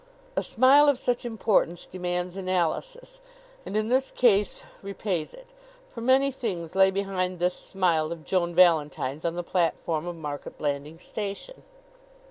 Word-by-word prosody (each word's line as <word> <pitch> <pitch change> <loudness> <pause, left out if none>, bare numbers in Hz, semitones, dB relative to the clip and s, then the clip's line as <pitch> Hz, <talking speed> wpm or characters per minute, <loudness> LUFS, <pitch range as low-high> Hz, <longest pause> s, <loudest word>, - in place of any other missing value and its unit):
A - - +1
smile 275 +5 +5
of 280 - +2
such 245 -1 -1
importance 215 -6 0
demands 180 0 -3
analysis, 195 - -2 0.5
and 210 - -2
in 215 0 0
this 260 +2 +2
case 210 -5 +2 0.2
repays 195 -4 -3
it; - - -16 0.4
for 230 - -9
many 265 +3 +3
things 185 -11 -4
lay 190 0 +5
behind 190 -2 -2
this 180 +1 +1
smile 170 -6 0
of 165 -2 -7
Joan 175 -2 0
Valentine's 155 -4 +2
on 170 0 -1
the 175 - -3
platform 170 -2 -1
of 175 - -4
Market 150 -3 -7
Blandings 145 +2 -4
Station. 210 - -6
185 Hz, 145 wpm, -26 LUFS, 170-230 Hz, 0.5 s, smile